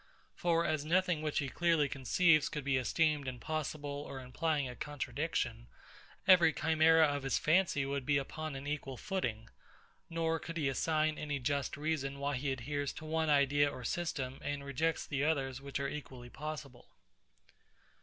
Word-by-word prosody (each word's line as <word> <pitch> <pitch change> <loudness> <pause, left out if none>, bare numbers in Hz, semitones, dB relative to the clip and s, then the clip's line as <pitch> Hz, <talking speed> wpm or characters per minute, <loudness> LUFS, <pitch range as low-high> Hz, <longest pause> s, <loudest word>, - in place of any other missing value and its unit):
For 170 -1 +1
as 155 -2 0
nothing 175 0 +2
which 155 -1 -2
he 140 - +1
clearly 165 0 +2
conceives 155 +4 +3
could 150 - -4
be 135 -1 +2
esteemed 150 +2 +1
impossible 145 +2 -3
or 135 - -6
implying 140 +3 -1
a 125 - -7
contradiction, 140 - -3 0.6
every 180 -4 +7
chimera 160 +1 +5
of 145 -1 -1
his 135 0 0
fancy 160 -4 +2
would 140 0 -2
be 140 +2 +2
upon 155 +2 -4
an 135 +1 -6
equal 140 -3 -4
footing; 120 - -3 0.6
nor 165 -1 0
could 165 +1 -6
he 150 -4 +1
assign 155 +3 +1
any 145 -1 -2
just 140 +1 -1
reason 145 -2 -2
why 140 0 -1
he 140 +2 -1
adheres 140 +2 -2
to 155 - -9
one 160 0 0
idea 145 0 +4
or 125 - -8
system, 135 -4 -2
and 145 -1 -3
rejects 155 +4 0
the 140 -1 -1
others 135 -4 0
which 140 0 -4
are 140 - -1
equally 130 -5 -7
possible. 150 -4 -7
145 Hz, 165 wpm, -34 LUFS, 135-160 Hz, 0.6 s, every